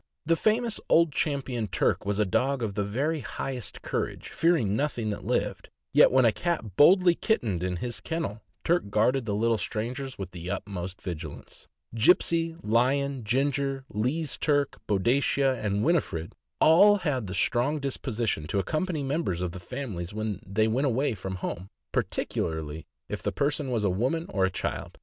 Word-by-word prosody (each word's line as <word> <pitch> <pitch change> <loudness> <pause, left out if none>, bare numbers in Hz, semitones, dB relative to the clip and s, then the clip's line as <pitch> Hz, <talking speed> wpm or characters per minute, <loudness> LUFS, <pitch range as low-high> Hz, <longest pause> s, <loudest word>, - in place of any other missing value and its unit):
The 165 +2 +3
famous 220 +4 +1
Old 170 -1 +5
Champion 135 -6 -1
Turk 95 +1 0
was 100 0 0
a 105 - +3
dog 130 +7 0
of 105 -3 -2
the 100 +1 -1
very 140 +10 -1
highest 130 -3 -5
courage, - - -3
fearing 160 - +2
nothing 120 -5 -1
that 105 - -6
lived, - - -1 0.2
yet - - +7
when 130 -1 +5
a 115 - +6
cat 115 - -2
boldly 180 - +6
kittened 115 - 0
in 90 0 -1
his 120 +6 -3
kennel, 115 -11 -3 0.2
Turk 170 -10 +1
guarded 115 +5 +2
the 105 -2 -1
little 115 +1 +2
strangers 125 +7 -4
with 95 -2 -6
the 90 0 -7
utmost 95 -1 -5
vigilance. 80 -4 -7 0.3
Gipsey, 165 +6 +3
Lion, 130 +4 +1
Ginger, 135 +3 0
Lee's 130 +9 -1
Turk, 145 -2 0
Boadicea, 130 +5 +2
and 100 0 0
Winifred 130 - 0 0.3
all 200 +6 +7
had 145 - -1
the 95 - -5
strong 125 - +1
disposition 120 - -2
to 100 - -2
accompany 155 - -1
members 135 - -1
of 90 -1 -2
the 95 - -8
families 95 -3 -6
when 110 -2 -3
they 110 +2 +1
went 130 +6 +1
away 130 +1 +1
from 95 -2 -5
home, 95 0 -5 0.2
particularly 80 -1 -2 0.2
if - - -5
the - - -1
person 145 -1 -1
was 115 -4 0
a 100 - +3
woman 130 - 0
or 95 -2 +1
a - - +1
child. 90 - -4
120 Hz, 170 wpm, -27 LUFS, 100-145 Hz, 0.3 s, yet